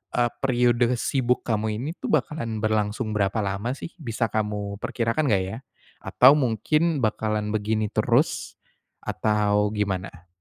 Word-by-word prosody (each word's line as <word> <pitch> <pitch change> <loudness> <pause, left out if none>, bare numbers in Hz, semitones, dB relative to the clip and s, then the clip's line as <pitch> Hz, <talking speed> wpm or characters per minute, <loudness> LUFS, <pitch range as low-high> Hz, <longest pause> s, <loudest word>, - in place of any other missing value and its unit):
eee, 120 -1 +2
periode 120 -2 +3
sibuk 125 -2 0
kamu 110 -1 0
ini 145 - -3
tuh - - -4
bakalan 130 -7 -1
berlangsung 110 +1 0
berapa 100 +1 +1
lama 100 +5 -2
sih? 165 - -8
Bisa 115 -4 -2
kamu 105 -2 -2
perkirakan 120 +6 -1
enggak 95 -2 +3
ya? 95 +4 -5 0.5
Atau 135 +3 +6
mungkin 150 +6 +1
bakalan 105 -1 -1
begini 110 0 0
terus, - - +1 0.5
atau 105 -1 +1
gimana? 95 -3 -3
110 Hz, 135 wpm, -25 LUFS, 105-125 Hz, 0.5 s, Atau